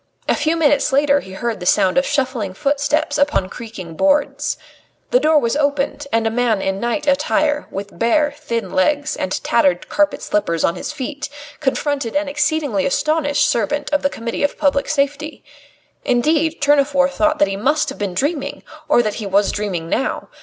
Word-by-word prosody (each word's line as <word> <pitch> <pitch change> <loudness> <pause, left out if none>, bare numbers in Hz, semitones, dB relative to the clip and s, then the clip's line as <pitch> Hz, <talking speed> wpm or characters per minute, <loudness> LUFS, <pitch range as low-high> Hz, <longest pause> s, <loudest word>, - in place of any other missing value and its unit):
A - - +3
few 315 +3 0
minutes 290 -2 +2
later 285 +1 +3
he 190 -7 -11
heard 230 +1 -3
the 180 - -7
sound 185 - +3
of 270 - +2
shuffling 255 -9 -1
footsteps 290 +3 0
upon 285 -10 +1
creaking 210 -8 -8
boards. 290 - +1 0.5
The - - +5
door 310 -5 +3
was 235 -4 +1
opened, 285 -1 -1
and 225 0 +1
a 225 - +1
man 230 -3 +1
in 195 0 -2
night 240 +6 -2
attire, 295 +1 +1
with 200 +1 -7
bare, 290 +6 +2
thin 235 -9 -4
legs 290 +10 +1
and 185 - -3
tattered 185 -6 +1
carpet 300 0 +1
slippers 170 -6 0
on - - +2
his 180 - -5
feet, 285 -1 -5 0.3
confronted 280 -3 -1
an 295 0 +1
exceedingly 285 - 0
astonished 295 +1 +1
servant 290 +8 -1
of 290 - +2
the 280 - +1
Committee 230 -3 -5
of 285 - 0
Public 280 -1 +1
Safety. 290 +1 -1 0.6
Indeed, 310 +6 +1
Tournefort 280 -1 +3
thought 310 +2 +1
that 200 - +3
he 195 - -3
must 295 +9 +1
have 270 - -8
been 200 -3 -3
dreaming, 290 - -2 0.3
or 240 - +4
that 215 +1 -3
he 205 - -4
was 200 +1 +2
dreaming 190 -6 -3
now. 265 - -2
275 Hz, 180 wpm, -19 LUFS, 220-295 Hz, 0.6 s, The